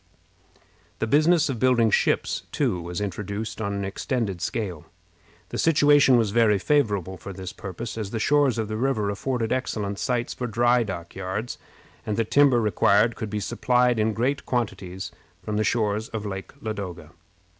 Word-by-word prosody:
The - - -1
business 155 +6 +4
of 130 -5 -3
building 120 -3 +3
ships, - - +1
too, 120 - 0
was 85 +2 -5
introduced 105 +3 -4
on 100 -1 -1
an 100 0 -2
extended 100 - -2
scale. 90 -3 -3 0.6
The - - -4
situation 145 -4 +5
was 110 -4 +1
very 110 -2 +4
favorable 100 - 0
for 100 - -8
this 95 -1 -7
purpose, 115 +5 -6
as 105 -3 -3
the 115 - -3
shores 140 +1 +3
of 110 -1 -1
the 110 0 -3
river 110 -5 0
afforded 115 +2 -2
excellent 105 -6 -2
sites 120 -1 -1
for 125 - -4
dock 115 -7 +1
yards, 95 +5 -4 0.4
and 105 - -3
the 115 - +1
timber 140 0 +4
required 105 +1 +3
could 110 - -5
be 105 0 -2
supplied 125 +3 +1
in 110 +1 +1
great 135 +6 0
quantities 95 -6 -3 0.3
from 105 -1 -2
the 110 - +2
shores 110 -1 0
of 110 -2 -5
Lake 95 -1 -5
Ladoga. 95 -7 -5
110 Hz, 165 wpm, -25 LUFS, 100-125 Hz, 0.6 s, situation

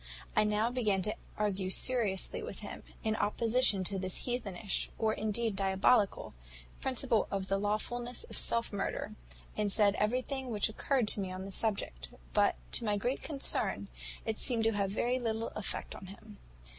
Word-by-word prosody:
"I - - +5
now 210 +3 +2
began 210 -7 +1
to 215 - -1 0.2
argue 205 -2 0
very - - -2
seriously 225 -7 +1
with - - -6
him, - - -7 0.2
in 220 -1 +1
opposition 225 -2 +3
to 195 +1 +1
this 185 -1 -3
heathenish, 215 -5 -2
or 220 -1 +2
indeed 220 0 0
diabolical, 195 +2 +3 0.5
principle 255 -3 +1
of 195 -1 -2
the 195 - +2
lawfulness 240 - -1
of 465 - -6
self 230 -2 +2
murder; 200 - -2 0.4
and 210 -1 0
said 205 -1 +4
everything 255 +4 0
which 210 -3 +1
occurred 245 +2 +1
to - - +1
me 190 -2 -2
on 185 +1 -5
the 195 - -7
subject; 190 - -1 0.2
but, - - +4 0.2
to - - -1
my 210 -2 +1
great 245 +6 -1
concern, 280 -3 -1 0.4
it 220 -1 -2
seemed 235 -3 +3
to 225 - +4
have 200 -2 0
very 245 +5 +1
little 225 -1 -1
effect 215 - -3
on 190 - -9
him. 205 +2 -12
215 Hz, 170 wpm, -33 LUFS, 195-235 Hz, 0.5 s, I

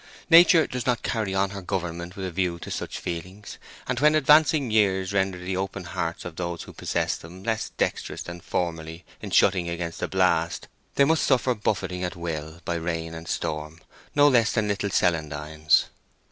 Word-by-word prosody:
Nature 170 0 +8
does 125 0 -5
not 125 -2 +1
carry 105 -4 -1
on 95 0 +1
her 100 -1 -6
government 90 -1 -4
with 95 - -5
a 90 - -4
view 90 -1 -1
to - - -8
such - - -4
feelings, 90 +4 -7 0.3
and 125 -1 -2
when 150 +2 +5
advancing 150 -3 +4
years 95 -3 +2
render 95 -2 +1
the 90 +1 -4
open 95 0 -3
hearts 85 0 -4
of 90 -2 -7
those 85 -1 -4
who - - -12
possess - - -1
them 90 +4 -11
less 110 0 -1
dexterous - - -2
than 85 0 -8
formerly 80 -1 -3 0.2
in - - -6
shutting 90 -3 +3
against 85 -1 -4
the - - -1
blast, 90 -3 +1 0.3
they 140 - +5
must 160 +2 +2
suffer 130 -1 +3
"buffeting 95 -4 -2
at 90 - -3
will 80 -1 -5
by 85 - -1
rain 80 -1 -3
and 80 0 -8
storm" 75 0 -3 0.4
no 145 0 +6
less 120 -4 +4
than 110 -3 +1
Little 100 0 -1
Celandines. 75 -3 +1
90 Hz, 185 wpm, -25 LUFS, 85-105 Hz, 0.4 s, Nature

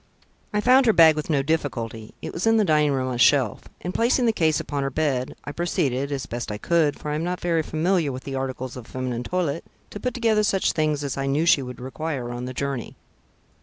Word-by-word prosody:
I 210 - 0
found 255 +2 +5
her 225 - +6
bag 160 -3 +7
with 155 +1 -4
no 140 -3 +2
difficulty 120 -8 -3
it - - -5
was 180 +6 -2
in 225 0 +5
the 215 - +3
dining 150 -3 +3
room 130 -1 -1
on - - -2
a - - -3
shelf, 130 -3 +3 0.2
and 180 - -4
placing 240 +2 +2
the 225 - +3
case 160 -5 +2
upon 145 -1 -3
her 135 - -1
bed, 135 -3 -1
I 145 - -5
proceeded, 140 -5 -1
as 140 -2 -3
best 120 -2 -5
I 105 - -3
could, 155 +3 +1
for 150 - -5
I - - -1
am 155 +2 -1
not 180 +1 -2
very 170 -2 +1
familiar 160 0 0
with 130 0 -7
the 135 - -6
articles 130 -1 -4
of 125 -3 -9
feminine 125 -2 -3
toilette, 165 +1 -2 0.3
to 205 - -7
put 250 0 -3
together 225 -3 +2
such 195 -2 +2
things 155 -2 0
as 140 -2 -3
I 135 0 -1
knew 145 +4 +1
she 155 -4 +5
would 125 -1 -7
require 130 -1 -4
on 120 +1 -5
the 130 - -5
journey. 140 -3 -3
145 Hz, 240 wpm, -24 LUFS, 130-170 Hz, 0.3 s, bag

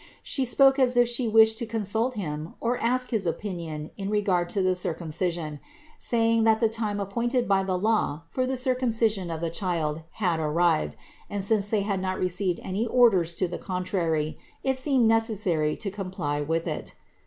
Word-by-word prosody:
She 270 - 0
spoke 270 +2 +4
as 250 -2 +3
if 240 0 +5
She 240 0 0
wished 220 0 +5
to 235 - -4
consult 225 +3 0
Him 155 -5 -5
or 240 +1 -1
ask 250 +2 +1
his 210 -6 0
opinion 165 -4 -4
in 195 0 -4
regard 195 -5 +1
to 195 -1 0
the 185 0 +3
Cir 180 -2 -1
cumcision, 165 -2 -3 0.4
saying 230 -1 +2
that 220 0 +4
the 225 - +3
time 215 -2 -2
appointed 235 +5 -1
by 195 -1 +3
law 190 -4 0
for 255 -1 -1
thcv 260 0 -1
Circumcision 230 -7 +1
of 165 -1 -4
the 165 -1 -2
Child 165 -4 -2
had 180 -6 0
arrived 155 - +1 0.3
and 205 -1 -3
since 205 0 +1
they 215 -2 +1
had 200 -2 -1
not 185 0 -2
received 180 0 -1
any 205 +5 -2
orders 195 -9 +3
to 185 - 0
the 175 - -6
contrary, 175 -5 -2 0.2
it 265 -1 0
seemed 260 -4 +3
necessary 210 -9 +1
to 200 - -4
comply 185 -7 -3
with 165 +3 -1
it. - - -5
200 Hz, 180 wpm, -26 LUFS, 170-230 Hz, 0.4 s, if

